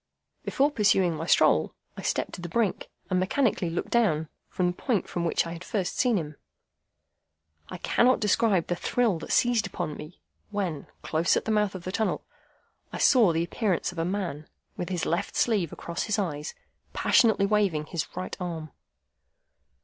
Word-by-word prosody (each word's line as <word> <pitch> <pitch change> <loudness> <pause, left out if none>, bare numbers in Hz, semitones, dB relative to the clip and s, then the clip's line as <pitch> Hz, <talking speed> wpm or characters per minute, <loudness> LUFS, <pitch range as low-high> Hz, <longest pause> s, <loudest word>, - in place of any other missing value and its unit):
Before 280 +2 +1
pursuing 195 - +3
my 160 +2 -5
stroll, - - +3 0.2
I - - -7
stepped - - -1
to 180 - -7
the 175 - -6
brink, 215 +1 -1 0.2
and 185 - +3
mechanically 195 -2 +1
looked 165 - -4
down, 160 -10 +2 0.2
from 180 - -1
the 180 - +1
point 215 +1 -1
from 170 -1 -3
which 170 - +1
I 165 - -5
had 170 +1 -8
first 195 -4 -2
seen 245 -4 +3
him. 150 -4 -5 1.3
I - - -6
cannot 255 +1 +3
describe 210 -3 +2
the 175 - -1
thrill 220 -1 0
that - - -7
seized 240 -2 +3
upon 165 -5 -4
me, 155 +4 -10 0.3
when, 190 -8 -3 0.2
close 165 +2 +2
at - - -2
the 220 - 0
mouth 210 -2 +1
of 185 - -7
the 185 - -4
tunnel, 220 +2 -1 0.7
I - - -5
saw 235 -9 +5
the 165 +1 0
appearance 185 -1 -1
of 175 - -7
a - - +1
man, 175 -5 -3 0.3
with 175 - -4
his 180 -3 -2
left 170 +3 -1
sleeve 205 -9 +1
across 170 - -4
his 210 -1 0
eyes, 150 -7 -3 0.4
passionately 220 -4 +4
waving 200 -7 +1
his 165 0 -3
right 90 +1 -4
arm. 165 -4 -5
180 Hz, 180 wpm, -27 LUFS, 165-215 Hz, 1.3 s, saw